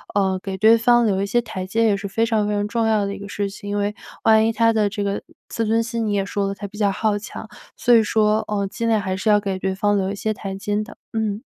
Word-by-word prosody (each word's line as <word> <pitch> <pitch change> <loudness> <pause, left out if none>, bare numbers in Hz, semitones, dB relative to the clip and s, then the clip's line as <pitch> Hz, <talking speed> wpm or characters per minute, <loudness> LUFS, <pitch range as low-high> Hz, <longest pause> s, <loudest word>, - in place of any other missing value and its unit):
呃， 190 -2 +1
给 190 -1 -5
对 220 +3 +6
方 240 +1 +4
留 195 -3 +1
一 - - 0
些 240 +4 +1
台 215 -5 -6
阶 225 +5 0
也 205 -3 +3
是 200 +1 -5
非 225 +4 0
常 220 -3 +1
非 210 - -1
常 205 0 0
重 230 0 0
要 215 -2 +2
的 200 - -3
一 - - -10
个 200 - -8
事 205 -1 -2
情。 205 +1 -9
因 205 - -1
为 205 0 0 0.3
万 220 0 +5
一 225 - 0
她 230 +1 +3
的 215 -2 +2
这 205 0 -3
个 200 0 -2 0.3
自 230 - -2
尊 225 +1 +2
心 230 -1 -2
你 205 - 0
也 200 -1 +1
说 200 0 -2
了 195 - -2
她 205 - -7
比 205 +1 -13
较 205 -2 +2
好 210 +1 0
强， 205 - -9 0.3
所 245 - +3
以 230 - +7
说 215 0 +2
呃 205 -1 -1
尽 230 +3 -3
量 220 -2 +2
还 190 -1 -2
是 200 +4 -1
要 210 0 +5
给 195 -2 -3
对 190 0 -2
方 205 +1 +1
留 190 -1 0
一 - - -4
些 215 +2 -2
台阶 205 +1 -3
的。 225 - -12 0.2
嗯。 220 -1 -2
210 Hz, 315 characters per minute, -21 LUFS, 200-225 Hz, 0.3 s, 以